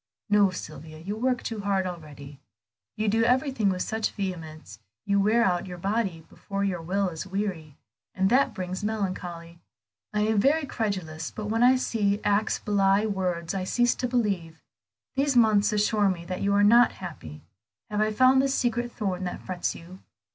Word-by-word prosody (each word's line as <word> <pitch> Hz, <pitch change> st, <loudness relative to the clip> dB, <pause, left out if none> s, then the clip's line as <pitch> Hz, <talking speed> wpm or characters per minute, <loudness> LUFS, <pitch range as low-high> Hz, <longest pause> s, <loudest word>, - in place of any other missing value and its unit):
"No, 205 Hz, -1 st, +5 dB
Sylvia, 155 Hz, -3 st, -8 dB
you 190 Hz, +6 st, -5 dB
work 250 Hz, +2 st, 0 dB
too 225 Hz, -2 st, -4 dB
hard 195 Hz, -2 st, 0 dB
already; 150 Hz, -5 st, -8 dB, 0.6 s
you 215 Hz, +1 st, -1 dB
do 225 Hz, +2 st, +3 dB
everything 250 Hz, -3 st, +2 dB
with 185 Hz, -1 st, -1 dB
such 220 Hz, -1 st, -1 dB
vehemence 165 Hz, -6 st, -6 dB, 0.3 s
you 200 Hz, 0 st, +2 dB
wear 220 Hz, +4 st, +3 dB
out 180 Hz, -3 st, 0 dB
your 180 Hz, -1 st, -7 dB
body 195 Hz, -3 st, -2 dB
before 200 Hz, 0 st, -5 dB
your 185 Hz, -4 st, -1 dB
will 190 Hz, +3 st, 0 dB
is 165 Hz, +2 st, -7 dB
weary, 185 Hz, -7 st, -4 dB, 0.4 s
and 190 Hz, 0 st, +2 dB
that 265 Hz, +3 st, +3 dB
brings 185 Hz, 0 st, -4 dB
melancholy. 180 Hz, -5 st, -4 dB, 0.5 s
I 210 Hz, -, 0 dB
am 215 Hz, 0 st, +2 dB
very 285 Hz, +7 st, +3 dB
credulous, 185 Hz, -, -3 dB
but 210 Hz, -1 st, -6 dB
when 225 Hz, +1 st, +1 dB
I 250 Hz, +1 st, +6 dB
see 215 Hz, -5 st, 0 dB
that 210 Hz, -, -4 dB
acts 205 Hz, +1 st, +2 dB
belie 200 Hz, 0 st, +2 dB
words 180 Hz, -5 st, -2 dB
I 190 Hz, -1 st, -2 dB
cease 240 Hz, +5 st, +2 dB
to 250 Hz, -, -2 dB
believe. 195 Hz, -10 st, -2 dB, 0.5 s
These 275 Hz, -1 st, +2 dB
months 215 Hz, -2 st, +4 dB
assure 210 Hz, -1 st, +2 dB
me 170 Hz, -2 st, -3 dB
that 185 Hz, +1 st, -5 dB
you 200 Hz, -, +1 dB
are 205 Hz, -, +4 dB
not 235 Hz, +3 st, +6 dB
happy; 115 Hz, -, -9 dB, 0.5 s
have 210 Hz, 0 st, 0 dB
I 215 Hz, 0 st, +2 dB
found 255 Hz, +4 st, +5 dB
the 275 Hz, -, +1 dB
secret 240 Hz, -3 st, 0 dB
thorn 190 Hz, -5 st, -3 dB
that 180 Hz, -, -5 dB
frets 180 Hz, -2 st, -2 dB
you?" 180 Hz, +3 st, -12 dB
200 Hz, 180 wpm, -26 LUFS, 180-220 Hz, 0.6 s, I